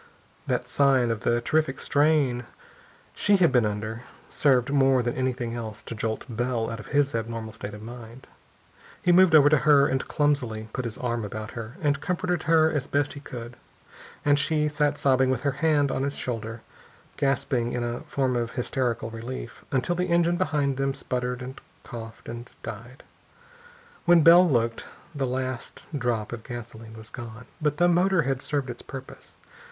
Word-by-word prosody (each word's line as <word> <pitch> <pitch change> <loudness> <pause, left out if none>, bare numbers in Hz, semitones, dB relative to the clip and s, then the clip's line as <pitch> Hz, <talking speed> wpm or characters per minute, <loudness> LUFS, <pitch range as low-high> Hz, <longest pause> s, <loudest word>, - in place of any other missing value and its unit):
That - - -1
sign 135 -4 +3
of 115 - -2
the 120 +3 +1
terrific 155 +1 0
strain 145 -5 +2 0.7
she 205 - +3
had 175 -3 +4
been 120 -4 +3
under 110 +2 -4 0.3
served 135 -2 +2
more 135 -2 +4
than 120 0 -1
anything 125 -2 -2
else 110 -3 -6
to - - -6
jolt 110 0 -3
Bell 120 -1 -1
out 115 - -5
of 105 - -10
his 145 -1 +2
abnormal 115 -1 -4
state 105 -2 -7
of 105 - -10
mind. 120 +2 -10 0.8
He 180 - +4
moved 180 -2 +6
over 145 -2 +8
to 150 0 +5
her 145 -2 +5
and 135 -1 -1
clumsily 125 -8 0
put 130 - -3
his 115 -2 -4
arm 120 -2 -2
about 110 +1 -6
her, 115 +4 -7
and 145 -1 +1
comforted 180 -1 -1
her 160 -1 +5
as 145 -3 -2
best 145 0 0
he 145 - -8
could. 120 -4 -8 0.7
And 145 0 +4
she 150 +1 +1
sat 150 0 0
sobbing 130 -1 +3
with 130 -2 0
her 140 - +1
head 145 -1 +2
on - - -1
his 140 +1 -1
shoulder, 115 -2 -4 0.5
gasping 135 -4 0
in 120 - -1
a 120 0 -3
form 130 -2 -1
of 120 -1 -2
hysterical 120 -2 -1
relief, 115 +3 -7
until 135 +6 +1
the 180 +1 -1
engine 170 0 +3
behind 150 -6 0
them 135 0 0
sputtered, 125 0 -3
and 130 +2 -8 0.2
coughed, 115 -1 -9
and 120 +1 -7
died. 120 +4 -8 1.0
When 175 -2 +6
Bell 175 +2 +8
looked, 115 -3 +1 0.3
the 135 -3 -1
last 130 -1 -4
drop 120 -5 -1
of 115 -2 -7
gasoline 115 -2 -9
was 110 0 -10
gone. 115 -1 -8 0.2
But 150 -1 0
the 175 - +4
motor 175 0 +3
had 135 -1 -1
served 140 -4 -2
its 120 - -10
purpose. 135 -1 -10
130 Hz, 180 wpm, -26 LUFS, 115-145 Hz, 1.0 s, over